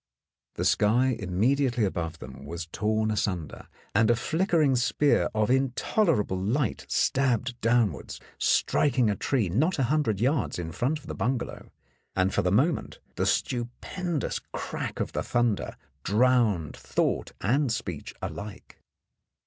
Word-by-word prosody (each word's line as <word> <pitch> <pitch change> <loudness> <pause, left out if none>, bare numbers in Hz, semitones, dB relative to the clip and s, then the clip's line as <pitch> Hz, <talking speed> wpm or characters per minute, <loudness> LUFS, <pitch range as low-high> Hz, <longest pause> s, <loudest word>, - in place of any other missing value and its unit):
The - - -2
sky 125 +5 +3
immediately 120 +6 +1
above 85 -3 -3
them 65 -1 -10
was 85 +3 -5
torn 110 +5 0
asunder, 90 -7 -3 0.3
and 110 +2 +4
a 120 - +5
flickering 160 - +2
spear 125 +4 +2
of 110 +2 +2
intolerable 130 - +1
light 125 +8 -1
stabbed 125 -2 +1
downwards, 115 - +1 0.2
striking 125 -6 +2
a - - -1
tree 115 +1 0
not 140 - +1
a 135 - +1
hundred 130 -10 +1
yards 130 +2 +1
in 85 -2 -4
front 130 - 0
of 150 - -16
the - - -5
bungalow, 125 +1 -3 0.5
and 95 0 +1
for - - +2
the 90 - 0
moment 140 - +1 0.2
the - - 0
stupendous 140 +7 -2
crack - - -4
of - - -2
the - - -2
thunder 120 -4 0 0.3
drowned 110 - +2
thought - - -1
and 130 +5 +2
speech 90 -8 -4
alike. 100 -1 -7
120 Hz, 135 wpm, -27 LUFS, 100-135 Hz, 0.5 s, a